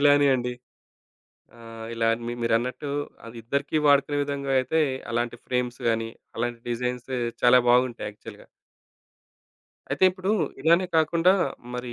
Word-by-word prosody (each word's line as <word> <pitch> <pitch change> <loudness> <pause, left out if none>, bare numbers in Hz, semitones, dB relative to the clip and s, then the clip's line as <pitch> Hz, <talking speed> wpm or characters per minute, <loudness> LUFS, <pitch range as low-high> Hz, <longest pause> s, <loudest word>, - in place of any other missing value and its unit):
ఇలానే 145 0 +5
అండి. 125 -1 -2 1.1
ఆహ్, 115 -1 -9
ఇలా 115 0 0 0.2
మి 120 - -2
మీరన్నట్టు 120 +5 -1 0.4
అదిద్దరికి 120 +6 -2
వాడుకునే 145 0 +3
విధంగా 140 -1 -3
అయితే 160 +5 +1 0.3
అలాంటి 120 0 -1
ఫ్రేమ్స్ 125 -1 -2
గాని, 115 0 -1 0.3
అలాంటి 120 -1 -2
డిజైన్స్ 125 +1 -3 0.3
చాలా 125 +1 +7
బాగుంటాయి 125 -3 +2
యాక్చువల్‌గా. 105 - -13 1.4
అయితే, - - +1
ఇప్పుడు 185 +1 -3 0.3
ఇలానే 170 +4 +4
కాకుండా 165 +3 +4 0.4
మరి 125 0 -5
125 Hz, 115 wpm, -25 LUFS, 120-145 Hz, 1.4 s, చాలా